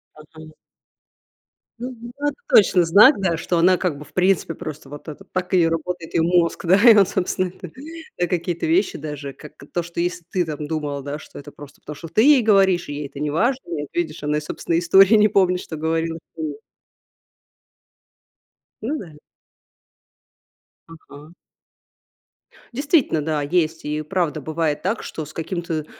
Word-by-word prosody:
Ага. 155 0 -14 1.2
Мгм. 240 -1 -8
Вот 290 0 0
точно 185 -4 +5
знак. 205 - +7
Да. 185 -4 0
Что 175 +1 -1
она 180 +2 +4
как 175 -6 -2
бы, 150 - -10
в 145 - -21
принципе, 185 -1 +1
просто, 155 -3 -8
вот 145 +3 -11
это, 155 - -9
так 185 0 -4
и 175 -3 +4
работает 165 +1 -4
ее - - +2
мозг, 170 0 +1
да? 175 +3 +5
И 225 - +9
он, 200 -2 +6
собственно, 185 0 -1
так. 180 -2 -11 0.5
Да, 175 - 0
какие-то 175 0 -2
вещи 360 +2 +1
даже. 145 -2 -7
Как 150 +2 -13 0.2
то, 175 - -1
что 170 0 -7
если 175 0 -2
ты 180 -2 0
там 150 -1 -5
думала, 145 -2 -3
да, 145 +2 -5
что - - -13
это 145 +1 -10
просто 145 -1 -14
потому, 150 - -8
что 165 - -9
ты 165 +7 +2
ей 285 -1 +6
говоришь, 195 -5 +3
и 145 - -4
ей 145 0 -5
это 140 0 -11
неважно, 190 - 0
ну 170 -3 -5
вот 145 - -8
видишь, 160 -3 -3
она 150 +1 0
и - - -2
собственные 165 +2 -2
истории 195 +5 +6
не 210 0 +5
помнит, 185 -3 +2
что 165 - -7
говорила. 165 +1 -1 0.2
М. 155 -2 -4 2.3
Ну 280 +8 -2
да. 160 -5 -11 1.7
Ага. 160 -1 -14 1.4
Действительно. 280 - +1
Да. 150 0 -1
Есть. 160 +1 -1
И 150 +1 -2
правда 155 -1 -2
бывает 155 0 -2
так, 200 +5 -2
что 155 - -6
с 150 - -13
каким-то, 165 -2 -4
165 Hz, 170 wpm, -21 LUFS, 155-185 Hz, 2.3 s, И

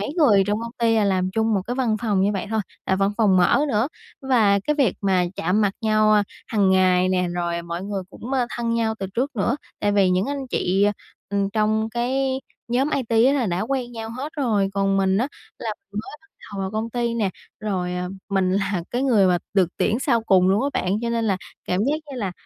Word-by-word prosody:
mấy 205 - -3
người 225 - +5
trong 210 +1 0
công 230 0 -6
ty 230 -1 +3
là 215 - +3
làm 185 -2 +1
chung 220 +2 +1
một 195 - 0
cái 245 - -2
văn 240 -5 +1
phòng 205 -4 +1
như 200 +2 +2
vậy 195 0 -3
thôi, 220 -1 +1 0.3
là 190 - +2
văn 195 +1 +2
phòng 205 -5 +4
mở 180 +9 +4
nữa. 225 +1 +1 0.3
Và 225 -7 +3
cái 300 - +2
việc 265 -9 +2
mà 190 -3 +2
chạm 180 +6 +1
mặt 205 -2 +2
nhau, 215 -1 +3
a, 210 - +5 0.2
hằng 205 -4 +2
ngày 185 -1 +4
nè, 180 -1 +1
rồi 170 -1 -2
mọi 170 +1 -5
người 195 -1 -3
cũng, 245 +6 -8
ơ, 255 -3 +1
thân 230 -1 -1
nhau 225 -1 0
từ 195 - -3
trước 260 +1 -1
nữa, 235 +7 +1 0.2
tại 205 - +1
vì 195 -2 +4
những 185 +3 +1
anh 275 -1 -3
chị, 190 +2 +1
à, 205 - +2 0.4
ừm, 200 -1 0
trong 215 +1 +1
cái 260 +3 -1 0.3
nhóm 265 +5 +1
IT 255 -4 -2 0.2
á 270 - +4
là 265 -6 +1
đã 175 0 -1
quen 245 +1 -2
nhau 225 -1 -6
hết 265 +6 -6
rồi, 215 -8 +1
còn 195 0 +1
mình 190 0 +2
á 250 - 0 0.3
là 225 - -3 0.2
mình 205 - -3
mới 260 - -10
bắt 320 - -26 0.3
đầu 195 - -4
vào 190 0 -2
công 220 +2 -3
ty 235 -1 -1
nè, 210 -5 0 0.3
rồi, 185 -4 -2
à, 180 0 -3 0.2
mình 190 -2 +1
là 195 -2 0
cái 245 +2 -1
người 225 -8 +4
mà 180 -1 +3 0.2
được 185 -4 +4
tuyển 220 +2 +1
sau 235 -5 +2
cùng 185 -4 +4
luôn 200 +6 +3
á 280 - +1
bạn, 190 +4 0
cho 235 - -1
nên 230 -1 0
là 195 -3 +1 0.3
cảm 180 +2 0
giác 285 - +1 0.2
như 270 - -6
là 200 -6 -3
210 Hz, 245 wpm, -23 LUFS, 190-235 Hz, 0.4 s, người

